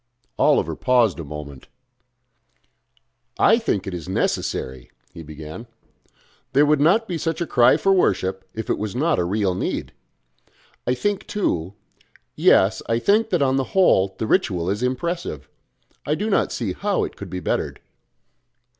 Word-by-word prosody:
Oliver - - +3
paused 120 -7 +2
a - - -4
moment. 70 -2 -9 1.7
"I 225 +3 +5
think 105 - -1
it 95 - -5
is 90 +1 -6
necessary," 65 -8 -2 0.2
he 85 - -9
began. 80 +8 -9 0.9
"There 145 +2 +5
would 150 -1 +2
not 205 +9 +3
be 175 -3 -3
such 165 -1 -2
a 170 - -1
cry 125 -4 +4
for 195 - +2
worship 95 - +1
if 110 0 -5
it - - -1
was 105 0 -4
not 155 +5 +1
a - - +2
real 95 +1 0
need. 90 - -3 0.9
I 125 - +2
think 205 +9 -2
too 95 - -2 0.6
yes, - - +4
I 115 - +2
think 210 - +2
that 145 - +2
on 135 0 +2
the 135 - +1
whole 95 - +4
the - - -2
ritual 95 - +1
is 105 +3 -3
impressive. 130 - -3 0.6
I 150 - 0
do 210 +5 -2
not - - +1
see 105 -7 -3
how - - -1
it - - -5
could - - -9
be 90 - -4
bettered...." - - -2
115 Hz, 160 wpm, -22 LUFS, -, 1.7 s, I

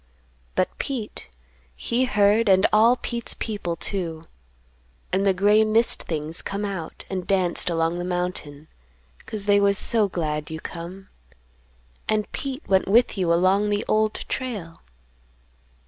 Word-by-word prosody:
But - - 0
Pete 245 -6 -4 0.5
he 240 - 0
heard 210 -1 +3
and 190 0 +5
all 225 +3 +6
Pete's 235 -2 -4
people, 200 -6 -3
too. 165 -3 -4 0.9
And 195 +2 +2
the - - +6
gray 205 +3 +4
mist 220 +2 +2
things 155 0 -3
come 200 +1 -3
out 190 -6 -6
and 185 -2 -4
danced 185 -2 +3
along 165 +1 0
the - - -3
mountain, 175 -5 -4 0.6
'cause 210 -2 -4
they 205 -1 +4
was 200 0 +3
so 220 -2 +2
glad 150 -4 -3
you 160 0 -5
come. 175 +4 -8 1.0
And 215 -1 0
Pete 275 +1 -5
went 190 -1 +2
with 230 +4 +4
you 180 -4 0
along 190 +4 +3
the 205 0 -1
Old 215 0 +2
Trail. 205 -11 -4
195 Hz, 140 wpm, -24 LUFS, 175-215 Hz, 1.0 s, all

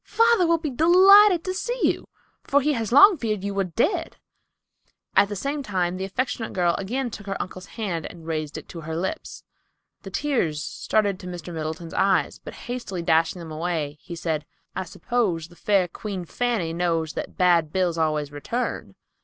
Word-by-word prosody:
Father 460 -6 +4
will 335 0 +4
be 310 -3 -4
delighted 365 +5 +7
to 370 - -2
see 485 +6 -3
you, - - +1 0.4
for 285 - +3
he 300 +2 +1
has 230 -4 -2
long 390 - +8
feared 215 -5 -2
you 200 0 -2
were 195 0 +1
dead." 325 - -1 1.0
At 200 - +5
the 205 - -4
same 280 +8 -2
time 185 -7 -1
the 190 - -3
affectionate 230 +2 -3
girl 175 -2 +2
again 240 +6 -2
took 205 -1 -9
her 195 - -3
uncle's 185 +1 -6
hand 180 -8 -2
and 165 -2 -12
raised 155 -2 -3
it - - -9
to 165 - -8
her 160 +1 -5
lips. 190 - -4 0.6
The - - -8
tears 175 - -1
started 205 -3 0
to 180 - -9
Mr. 175 -1 -7
Middleton's 160 +1 -5
eyes, 195 -1 +1
but - - -8
hastily 235 -8 -4
dashing 165 +1 +2
them 165 -2 -8
away, 155 -2 -3
he 170 - -8
said, 160 -3 -3 0.3
"I 190 - -3
suppose 175 -4 -1
the 175 - -17
fair 195 -1 +2
Queen 190 0 -6
Fanny 220 -6 -1
knows 165 -2 0
that - - -6
bad 170 -4 +3
bills 175 -2 0
always 155 -2 0
return?" 230 +12 -4
190 Hz, 185 wpm, -24 LUFS, 165-245 Hz, 1.0 s, long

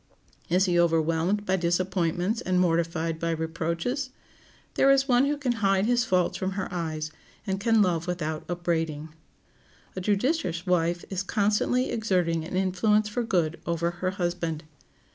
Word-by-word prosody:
Is 180 +3 +3
he 175 -2 +2
overwhelmed 165 +4 +1
by 190 0 +1
disappointments 180 +3 0
and 185 -4 +1
mortified 165 -2 0
by 165 - -1
reproaches? 165 - -2 0.6
There 275 - +4
is 275 0 +4
one 250 0 +4
who 290 +1 0
can 275 -4 0
hide 195 0 +3
his 245 +1 +2
faults 185 -6 +1
from 190 +1 -2
her 190 -1 -3
eyes, 155 -3 -3 0.3
and 195 -2 -2
can 225 0 +4
love 170 -3 0
without 160 -3 -3
up 175 0 -4
braiding. 160 -3 -1 0.9
A 185 - -3
judicious 205 - 0
wife 175 -1 +1
is 190 -1 -1
constantly 210 +5 +1
exerting 180 -7 0
an 175 +3 -6
influence 210 +3 +2
for 225 +4 -2
good 170 -8 0
over 170 0 0
her 180 +1 -2
husband. 175 -4 -2
180 Hz, 155 wpm, -27 LUFS, 165-205 Hz, 0.9 s, There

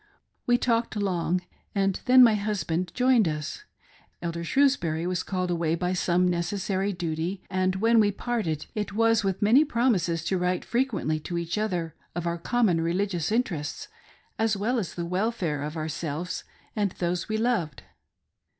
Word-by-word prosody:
We 245 0 +5
talked 230 -2 0
long, 180 -3 0 0.3
and 195 -1 +1
then 255 0 +8
my 230 -2 +6
husband 195 -4 -1
joined 250 -5 +4
us 155 - -4 0.3
— - - -31
Elder 170 0 -3
Shrewsbury 170 - +2
was 180 0 -1
called 185 -2 -2
away 165 -1 +1
by 180 +2 -1
some 180 0 +2
necessary 190 +3 -1
duty 175 +1 -3
— - - -47
and 185 0 +1
when 225 +4 +4
we 205 -1 +4
parted 205 -8 -2
it 210 -2 -3
was 225 0 +3
with 195 +1 -1
many 240 +8 +6
promises 220 - +1
to 185 +1 0
write 180 0 0
frequently 230 - 0
to 170 +3 -4
each 170 0 -2
other 180 -7 -2 0.2
of 175 -1 -3
our 170 0 -1
common 195 -4 +2
religious 175 +1 -1
interests, 175 -10 -2 0.5
as 220 -2 +2
well 235 +5 0
as 190 - -5
the 170 - -3
welfare 180 -5 -1
of 150 +2 -4
ourselvtes 160 +2 -4 0.3
and 205 -4 0
those 175 +2 -2
we 220 - 0
loved. 220 - -1
185 Hz, 165 wpm, -26 LUFS, 170-220 Hz, 0.5 s, then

